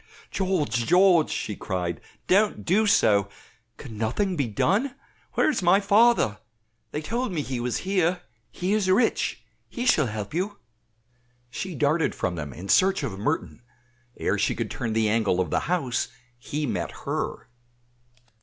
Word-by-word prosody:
"George, 150 - 0
George!" 180 -2 +5
she 105 - -3
cried, 90 -4 -3 0.2
"don't 205 +3 +2
do 210 +5 +3
so. 100 - +3 0.5
Can 110 -6 -9
nothing 180 - 0
be 140 -6 0
done? 205 - 0 0.4
Where - - +2
is 305 - +1
my 180 +2 +5
father? 205 - +3 0.5
they 150 - -4
told 235 +5 -2
me 160 -5 -2
he 130 -2 -4
was 120 0 -1
here. 180 -2 +1 0.3
He 185 +3 -1
is 210 -3 +1
rich, 220 +5 +1 0.3
he 245 - -4
shall 155 - +4
help 105 0 -5
you." 195 +5 -2 0.9
She 185 +6 -5
darted 155 +3 +1
from 90 - -2
them 75 -4 -5
in 90 +9 -9
search 190 - +3
of 95 -2 -4
Merton; 110 - -2 0.6
ere - - 0
she - - +1
could - - -3
turn 115 -2 -3
the 110 -1 +2
angle 105 -4 +1
of 90 - -1
the - - +2
house 150 -9 0 0.3
he 150 +5 -3
met 95 -9 -2 0.2
her. - - -3
155 Hz, 155 wpm, -25 LUFS, -, 0.9 s, George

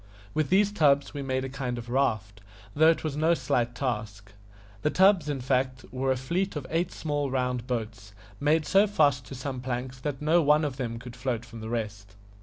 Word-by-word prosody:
With 155 -3 0
these 200 +3 +4
tubs 145 -7 +3
we 145 - -4
made 130 -1 -1
a - - -3
kind 130 -2 -4
of 120 0 -7
raft, 110 -6 -1 0.3
though 160 +2 +6
it 165 - +1
was 155 -3 -2
no 160 +3 +3
slight 125 -4 -1
task. 105 -6 -4 0.5
The 150 - +2
tubs, 190 -3 +4
in 140 -3 -2
fact, 130 0 0
were 130 +1 0
a 130 - +1
fleet 175 +9 -2
of 145 -3 -4
eight 170 +2 0
small 145 -2 -2
round 125 -2 -1
boats, 110 -5 -4 0.3
made 150 +2 +2
so 200 +5 +4
fast 145 -10 +2
to 135 - -8
some 130 0 -5
planks 125 +1 -4
that 135 0 -3
no 160 +3 +3
one 150 +1 +4
of 135 -3 -4
them 115 -3 -3
could 120 +1 -9
float 125 -2 -3
from 115 -1 -10
the 110 - -6
rest. 105 -4 -4
130 Hz, 210 wpm, -27 LUFS, 120-150 Hz, 0.5 s, though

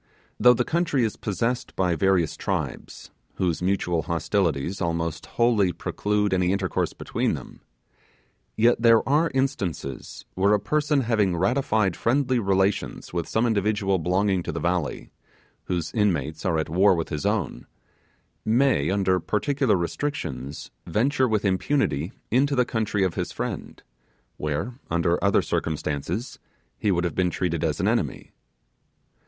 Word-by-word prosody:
Though 125 0 +7
the 125 - +1
country 165 -6 +1
is 110 - -1
possessed 115 +4 -2
by 90 -2 +1
various 90 -3 +2
tribes, - - -4 0.2
whose 90 -3 -1
mutual 90 -2 0
hostilities 85 0 -1
almost 85 -2 -2
wholly 115 -6 +2
prelude 105 +3 -1
any 90 -1 +2
intercourse 95 -2 -1
between - - -2
them; - - -10 1.0
yet 115 +1 +3
there 115 -1 +5
are 155 +4 +3
instances 95 - -3
where 100 +3 +3
a - - 0
person 150 +6 +1
having 105 -7 +1
ratified 105 -2 +1
friendly 130 +1 +1
relations 95 -3 0
with 85 -2 -2
some 110 +2 +1
individual 105 -3 +1
belonging 95 +4 +1
longing - - -1
to - - -2
the 80 - -4
valley, 85 -3 -2 0.5
whose 85 -3 -2
inmates 85 -6 0
are 85 -3 +1
at 80 - -1
war 95 +4 +4
with 80 -1 -3
his 75 - -3
own, 105 -3 -1 0.8
may, 110 - +2
under 95 -1 +2
particular 130 - +1
restrictions, 85 - -4 0.2
venture 130 +4 +2
with 110 -3 0
impunity 95 - 0 0.2
into 140 +4 +3
the 125 -1 +3
country 110 -4 -1
of 95 -3 0
his - - -3
friend, - - -5 0.5
where, 100 - -3
under 85 +1 +1
other 100 0 +3
circumstances, 80 - -3 0.4
he 105 - 0
would 90 -2 +2
have 85 - -1
been 90 -1 +1
treated 85 -2 -2
as 80 -3 0
an - - +1
enemy. - - -1
95 Hz, 145 wpm, -25 LUFS, 85-115 Hz, 1.0 s, Though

